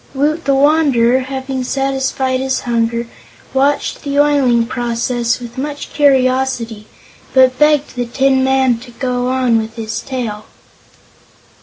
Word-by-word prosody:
Woot 305 Hz, +4 st, 0 dB
the 275 Hz, -1 st, +2 dB
Wanderer, 270 Hz, -4 st, +3 dB
having 265 Hz, 0 st, -4 dB
satisfied 265 Hz, 0 st, -1 dB
his 265 Hz, 0 st, -1 dB
hunger, 235 Hz, 0 st, -1 dB, 0.5 s
watched 275 Hz, +2 st, 0 dB
this 280 Hz, 0 st, -3 dB
oiling 275 Hz, -5 st, +3 dB
process 240 Hz, 0 st, -1 dB
with 240 Hz, +1 st, -8 dB
much 290 Hz, +1 st, -5 dB
curiosity, 255 Hz, -6 st, +1 dB, 0.5 s
but 260 Hz, -1 st, +4 dB
begged 300 Hz, -2 st, +2 dB
the 245 Hz, -1 st, -2 dB
Tin 265 Hz, +1 st, +2 dB
Man 265 Hz, -3 st, +2 dB
to 250 Hz, +1 st, -13 dB
go 250 Hz, 0 st, -2 dB
on 255 Hz, -3 st, +2 dB
with 220 Hz, 0 st, -6 dB
his 225 Hz, -1 st, -4 dB
tale. 230 Hz, -6 st, -5 dB
260 Hz, 130 wpm, -16 LUFS, 240-270 Hz, 0.5 s, but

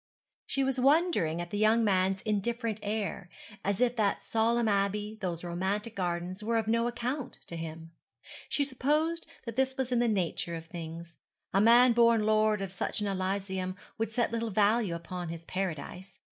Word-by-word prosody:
She 275 Hz, -, 0 dB
was 265 Hz, -1 st, 0 dB
wondering 275 Hz, -, +3 dB
at 175 Hz, 0 st, -7 dB
the 205 Hz, -, -2 dB
young 220 Hz, +2 st, +4 dB
man's 190 Hz, -2 st, +2 dB
indifferent 225 Hz, +1 st, -1 dB
air, 205 Hz, -3 st, -3 dB, 0.3 s
as 200 Hz, 0 st, 0 dB
if 245 Hz, -1 st, +2 dB
that 205 Hz, -3 st, +1 dB
solemn 230 Hz, +1 st, +1 dB
abbey, 205 Hz, +1 st, 0 dB
those 175 Hz, -3 st, -3 dB
romantic 190 Hz, +6 st, -2 dB
gardens, 180 Hz, +2 st, -2 dB
were 230 Hz, +1 st, +1 dB
of 220 Hz, -1 st, 0 dB
no 230 Hz, +1 st, +2 dB
account 250 Hz, +3 st, -3 dB
to 170 Hz, -, -7 dB
him. 165 Hz, 0 st, -7 dB, 0.6 s
She 285 Hz, -, +1 dB
supposed 300 Hz, +5 st, 0 dB, 0.2 s
that 230 Hz, 0 st, -6 dB
this 265 Hz, 0 st, +1 dB
was 260 Hz, -1 st, -1 dB
in 245 Hz, -, +3 dB
the 240 Hz, -, +3 dB
nature 175 Hz, -4 st, -1 dB
of 165 Hz, 0 st, -7 dB
things. 165 Hz, 0 st, -8 dB, 0.3 s
A 195 Hz, -, +4 dB
man 240 Hz, +3 st, +7 dB
born 230 Hz, -2 st, +4 dB
lord 215 Hz, -1 st, +3 dB
of 190 Hz, -, -5 dB
such 190 Hz, -, -2 dB
an 210 Hz, -, -1 dB
elysium 190 Hz, -1 st, -2 dB, 0.2 s
would 225 Hz, -, 0 dB
set 235 Hz, +1 st, 0 dB
little 230 Hz, 0 st, -1 dB
value 210 Hz, -2 st, +2 dB
upon 175 Hz, +1 st, -5 dB
his 165 Hz, 0 st, -7 dB
paradise. 185 Hz, +1 st, -5 dB
210 Hz, 175 wpm, -30 LUFS, 185-235 Hz, 0.6 s, man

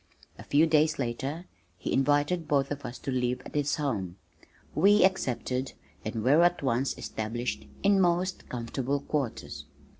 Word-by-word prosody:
A -, -, -8 dB
few 150 Hz, +3 st, +4 dB
days 155 Hz, -1 st, +3 dB
later 135 Hz, +7 st, -3 dB, 0.3 s
he -, -, -3 dB
invited 145 Hz, +5 st, +2 dB
both 140 Hz, -2 st, +1 dB
of 145 Hz, 0 st, -4 dB
us 120 Hz, -, -6 dB
to 135 Hz, -, -5 dB
live 125 Hz, -1 st, 0 dB
at -, -, -10 dB
his 145 Hz, -1 st, +1 dB
home. 100 Hz, -11 st, -2 dB, 0.6 s
We 205 Hz, 0 st, +5 dB
accepted 130 Hz, -7 st, -1 dB, 0.3 s
and 110 Hz, 0 st, -3 dB
were 145 Hz, +7 st, +5 dB
at 175 Hz, -3 st, +3 dB
once 130 Hz, +1 st, 0 dB
established 110 Hz, -, -4 dB, 0.2 s
in 200 Hz, -1 st, +4 dB
most 180 Hz, +1 st, 0 dB
comfortable 130 Hz, +3 st, -2 dB
quarters. 125 Hz, -, -3 dB
140 Hz, 150 wpm, -28 LUFS, 120-155 Hz, 0.6 s, We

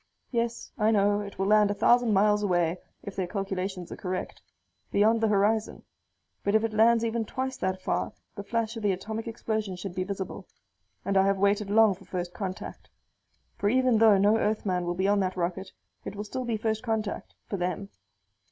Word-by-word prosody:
Yes, 235 Hz, -1 st, -2 dB
I 215 Hz, 0 st, +3 dB
know, 205 Hz, -1 st, +3 dB
it 205 Hz, -1 st, -7 dB
will 195 Hz, -, 0 dB
land 210 Hz, 0 st, +5 dB
a 205 Hz, -, -1 dB
thousand 240 Hz, +1 st, +4 dB
miles 210 Hz, +1 st, +3 dB
away, 175 Hz, -3 st, +1 dB, 0.2 s
if 200 Hz, -, -7 dB
their 185 Hz, -2 st, -2 dB
calculations 190 Hz, -2 st, -4 dB
are -, -, -4 dB
correct. 185 Hz, -1 st, -5 dB, 0.5 s
Beyond 220 Hz, +3 st, +3 dB
the 225 Hz, -, +3 dB
horizon. 210 Hz, +1 st, +1 dB, 0.6 s
But 200 Hz, +1 st, +1 dB
if 220 Hz, -, +4 dB
it 225 Hz, -1 st, -1 dB
lands 230 Hz, +1 st, +4 dB
even 230 Hz, 0 st, -1 dB
twice 260 Hz, +4 st, -3 dB
that 185 Hz, 0 st, -2 dB
far -, -, -1 dB, 0.2 s
the -, -, -6 dB
flash 225 Hz, +2 st, -2 dB
of 225 Hz, -, -5 dB
the 205 Hz, -2 st, +2 dB
atomic 220 Hz, +5 st, -5 dB
explosion 220 Hz, -3 st, -3 dB
should 180 Hz, 0 st, -6 dB
be 185 Hz, 0 st, -1 dB
visible. 190 Hz, 0 st, -5 dB, 0.6 s
And 195 Hz, 0 st, +1 dB
I 190 Hz, 0 st, +5 dB
have 195 Hz, 0 st, +2 dB
waited 200 Hz, +1 st, +1 dB
long 220 Hz, 0 st, +5 dB
for 190 Hz, +1 st, -15 dB
first 180 Hz, -1 st, -4 dB
contact. 190 Hz, -2 st, -6 dB, 0.7 s
For 205 Hz, -, +2 dB
even 255 Hz, -1 st, +3 dB
though 220 Hz, -3 st, +6 dB
no 205 Hz, +3 st, +4 dB
Earthman 195 Hz, -5 st, 0 dB
will 175 Hz, 0 st, -2 dB
be 190 Hz, +2 st, 0 dB
on 205 Hz, 0 st, +3 dB
that 185 Hz, -1 st, -1 dB
rocket, 185 Hz, +2 st, -2 dB, 0.3 s
it -, -, -6 dB
will 205 Hz, -, -4 dB
still 255 Hz, +4 st, -5 dB
be 230 Hz, -2 st, -1 dB
first 220 Hz, 0 st, -1 dB
contact 220 Hz, -4 st, -3 dB
for 200 Hz, -, -4 dB
them. 180 Hz, +2 st, -3 dB
205 Hz, 200 wpm, -28 LUFS, 190-220 Hz, 0.7 s, though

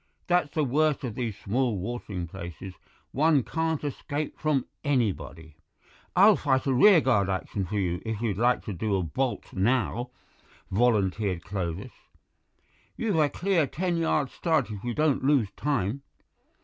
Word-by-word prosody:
That's 175 Hz, -4 st, +2 dB
the 155 Hz, -, +2 dB
worst 145 Hz, +2 st, +1 dB
of 120 Hz, -4 st, -3 dB
these 115 Hz, -4 st, -3 dB
small 120 Hz, +1 st, 0 dB
watering 100 Hz, -3 st, -4 dB
places; 85 Hz, +2 st, -8 dB, 0.4 s
one 150 Hz, -2 st, +3 dB
can't 160 Hz, +1 st, -2 dB
escape 145 Hz, +1 st, -4 dB
from 150 Hz, -4 st, +1 dB, 0.2 s
anybody." 100 Hz, -, -2 dB, 0.6 s
"I'll 205 Hz, +3 st, +7 dB
fight 130 Hz, -5 st, +1 dB
a 135 Hz, -, +2 dB
rearguard 130 Hz, -, +5 dB
action 95 Hz, +1 st, -2 dB
for 105 Hz, -, -5 dB
you 90 Hz, -3 st, -1 dB
if 110 Hz, -2 st, -3 dB
you 115 Hz, -3 st, 0 dB
like 120 Hz, +5 st, +1 dB
to 105 Hz, -, -4 dB
do 100 Hz, +3 st, -1 dB
a 95 Hz, -, 0 dB
bolt 125 Hz, -, -3 dB
now," 120 Hz, +3 st, 0 dB, 0.6 s
volunteered 100 Hz, -4 st, +1 dB
Clovis; 90 Hz, 0 st, -4 dB, 1.1 s
"you've 210 Hz, -8 st, 0 dB
a 150 Hz, -2 st, +4 dB
clear 175 Hz, -4 st, +1 dB
ten 175 Hz, +3 st, -2 dB
yards 150 Hz, -5 st, 0 dB
start 155 Hz, -, 0 dB
if 100 Hz, -2 st, -7 dB
you 120 Hz, -1 st, -3 dB
don't 150 Hz, -4 st, +1 dB
lose 135 Hz, -7 st, +3 dB
time." 135 Hz, -3 st, -1 dB
125 Hz, 150 wpm, -27 LUFS, 100-150 Hz, 1.1 s, I'll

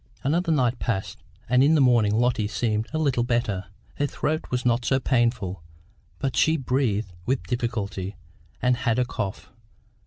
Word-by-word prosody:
Another 165 Hz, +5 st, +1 dB
night 125 Hz, -5 st, +2 dB
passed, 95 Hz, -6 st, -3 dB, 0.3 s
and 125 Hz, +2 st, +4 dB
in 155 Hz, +3 st, +5 dB
the -, -, +4 dB
morning 120 Hz, -6 st, +4 dB
Lotty 120 Hz, -2 st, +2 dB
seemed 110 Hz, +1 st, -1 dB
a 155 Hz, -, -2 dB
little 140 Hz, -6 st, +1 dB
better. 120 Hz, -6 st, 0 dB, 0.3 s
Her 145 Hz, -, +1 dB
throat 155 Hz, +2 st, -2 dB
was 125 Hz, 0 st, -2 dB
not 120 Hz, 0 st, +2 dB
so 135 Hz, +2 st, +2 dB
painful, 115 Hz, -, 0 dB, 0.6 s
but 135 Hz, -2 st, -2 dB
she 160 Hz, +1 st, +3 dB
breathed 120 Hz, -, 0 dB
with 130 Hz, -6 st, 0 dB
difficulty, 105 Hz, -4 st, -3 dB, 0.5 s
and 125 Hz, -1 st, +3 dB
had 120 Hz, -2 st, 0 dB
a 125 Hz, -, +2 dB
cough. 100 Hz, -5 st, -5 dB
120 Hz, 160 wpm, -25 LUFS, 110-130 Hz, 0.6 s, in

